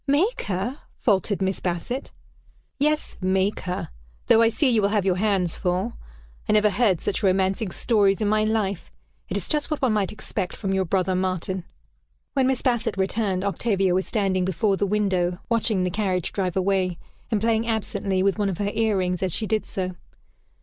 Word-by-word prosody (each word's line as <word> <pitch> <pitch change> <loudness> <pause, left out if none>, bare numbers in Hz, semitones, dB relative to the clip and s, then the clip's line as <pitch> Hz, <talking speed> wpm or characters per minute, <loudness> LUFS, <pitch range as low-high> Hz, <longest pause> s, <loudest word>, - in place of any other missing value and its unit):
"Make 330 - +2
her!" 205 +9 -2 0.2
faltered 200 -2 +1
Miss 190 0 -1
Bassett. 185 +10 -3 0.7
"Yes, 300 +2 0
'make 190 +2 +1
her' 180 0 -4 0.4
though 225 - +5
I 225 - +5
see 230 +6 +1
you 230 -4 +3
will 200 - +2
have 205 -2 +1
your 185 -2 +2
hands 190 -4 +1
full. 185 +6 -1 0.6
I - - +4
never 210 0 +4
heard 195 -4 +2
such 195 - -2
romancing 190 +1 +1
stories 200 -1 +2
in 215 - 0
my 215 +1 +2
life. 215 -4 -1 0.4
It - - -1
is - - 0
just 300 -2 0
what 305 - -1
one 255 -5 +2
might 205 -3 0
expect 200 -3 -4
from 195 -2 -2
your 190 -1 +1
brother 185 +1 +1
Martin." 185 0 -2 0.7
When 265 -2 +2
Miss 265 -1 0
Bassett 235 -4 0
returned, 195 -1 0
Octavia 195 -2 +1
was 185 +1 0
standing 195 -4 +1
before 195 +3 +1
the 200 +1 0
window, 185 -4 +1
watching 220 -4 +1
the 180 - 0
carriage 190 -4 -1
drive 185 -3 -1
away, 185 -2 +1 0.3
and 220 -3 +1
playing 225 +1 +1
absently 200 -4 -1
with 200 +1 +1
one 205 -1 +1
of 185 - -3
her 205 0 -1
ear 220 -3 +1
rings 180 -1 -1
as 190 -1 0
she 220 - -2
did 215 0 -1
so. 185 -1 -3
200 Hz, 190 wpm, -24 LUFS, 185-220 Hz, 0.7 s, though